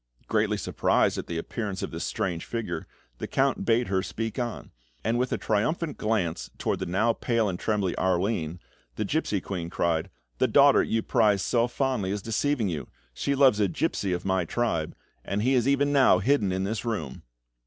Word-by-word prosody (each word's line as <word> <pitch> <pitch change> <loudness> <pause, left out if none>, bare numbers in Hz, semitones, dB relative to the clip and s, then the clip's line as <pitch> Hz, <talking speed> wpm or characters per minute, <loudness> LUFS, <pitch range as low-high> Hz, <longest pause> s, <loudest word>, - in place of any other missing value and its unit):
Greatly - - +1
surprised - - +1
at - - -6
the 85 - -3
appearance 100 +2 -4
of - - -4
this - - -4
strange 85 -3 -2
figure, 115 -2 -4 0.3
the - - -4
Count 135 -1 +1
bade 120 +1 +3
her 95 -2 0
speak 110 +4 -4
on; 120 -2 -4 0.3
and 115 +2 +1
with 125 0 0
a - - +1
triumphant 150 +9 -1
glance 105 -7 -1
towards - - -1
the - - -3
now 105 +6 +2
pale 115 -2 0
and 90 -2 -3
trembling 100 -4 0
Arline, 90 -2 0 0.4
the 105 - -2
gipsy 105 -5 0
queen 90 -2 -5
cried: 85 0 0 0.3
"The - - +4
daughter - - +6
you 115 0 0
prize 100 -3 +3
so 120 0 +2
fondly 125 -6 -1
is 100 0 -3
deceiving 115 +1 0
you! 75 -8 -4 0.3
She 140 - -1
loves 130 -6 +5
a 105 - +3
gipsy 100 - -1
of 90 +1 -2
my 95 -1 +1
tribe, 85 -4 -1 0.3
and 100 +2 -2
he 130 +3 +3
is 125 -1 +2
even 140 +1 +2
now 135 -9 +6
hidden 105 -1 +2
in 95 +1 -1
this 105 +2 -2
room!" 80 - -4
105 Hz, 190 wpm, -27 LUFS, 95-120 Hz, 0.4 s, daughter